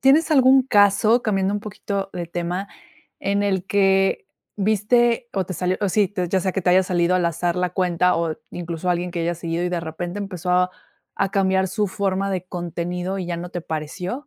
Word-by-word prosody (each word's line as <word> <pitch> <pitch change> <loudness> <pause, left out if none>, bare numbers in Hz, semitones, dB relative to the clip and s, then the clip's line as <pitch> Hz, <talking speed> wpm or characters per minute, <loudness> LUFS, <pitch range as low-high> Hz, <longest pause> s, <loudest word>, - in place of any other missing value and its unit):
¿tienes 300 +5 +4
algún 265 -2 +6
caso, 210 +1 +4
cambiando 195 -2 0
un 205 - -2
poquito 200 -2 -4
de 175 -1 -4
tema, 175 +3 -3 0.5
en 200 +1 0
el 190 -2 0
que 195 -1 +2 0.3
viste 230 +4 +2
o 190 -2 0
te 185 - -5
salió 180 +2 0
o 205 - +1
si, 205 +1 +1 0.2
ya 190 - +1
sea 190 0 -1
que 195 - -1
te 180 - +3
haya 185 +1 +5
salido 180 -1 +1
al 180 -1 +2
azar 170 +1 -1
la 180 -1 0
cuenta 180 -1 +1
o 165 -2 -1
incluso 170 0 -3
alguien 175 0 -1
que 170 -1 -3
hayas 170 0 -1
seguido 170 0 -2
y - - 0
de 175 - -1
repente 175 +3 -5
empezó 185 -3 -4
a 180 0 +3 0.5
a 195 - 0
cambiar 190 -1 +2
su 210 +3 0
forma 195 0 -1
de 185 -2 -2
contenido 175 +2 -4
y 185 - -4
ya 170 -1 -3
no 175 +1 -6
te 175 - -4
pareció? 175 - -5
185 Hz, 205 wpm, -22 LUFS, 175-200 Hz, 0.5 s, algún